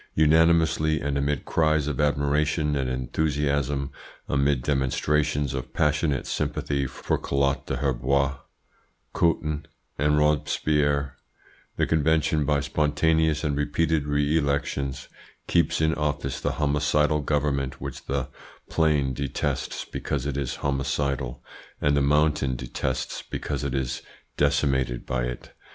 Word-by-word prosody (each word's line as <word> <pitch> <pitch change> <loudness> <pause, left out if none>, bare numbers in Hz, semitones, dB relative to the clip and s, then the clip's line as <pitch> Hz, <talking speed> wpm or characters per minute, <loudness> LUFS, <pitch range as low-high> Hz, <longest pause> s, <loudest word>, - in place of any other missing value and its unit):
Unanimously 80 0 +4
and 70 0 -2
amid 70 0 -1
cries 80 -2 +2
of 75 -1 -1
admiration 75 +1 +1
and 65 -2 -1
enthusiasm, 70 +1 -1 0.4
amid 70 -1 +1
demonstrations 75 +1 +1
of 65 -1 -5
passionate 75 -2 +1
sympathy 70 -2 -1
for 65 - -2
Collot 70 0 0
d'Herbois, 70 +1 0 0.8
Couthon, 75 -2 0 0.3
and 75 +1 +3
Robespierre, 75 -1 +1 0.6
the - - +1
Convention 80 -1 +2
by 70 0 +2
spontaneous 75 +2 +1
and 75 -2 0
repeated 75 +1 0
re 75 +1 +1
elections 70 -2 -2 0.4
keeps 85 -3 +2
in 80 0 +3
office 75 -4 -2
the - - 0
homicidal 75 0 +2
government 70 -2 -1
which 70 -1 -7
the 70 -1 -1 0.4
Plain 75 -5 +2
detests 70 0 -2
because - - -3
it 70 -2 -2
is 70 -3 -2
homicidal, 70 -2 -1 0.4
and 70 0 +2
the 70 - +3
Mountain 75 -2 +2
detests 65 +1 -3
because - - -4
it 70 -1 -2
is 65 0 -2 0.3
decimated 70 -4 +1
by - - -1
it. 60 0 -7
70 Hz, 120 wpm, -25 LUFS, 70-75 Hz, 0.8 s, Unanimously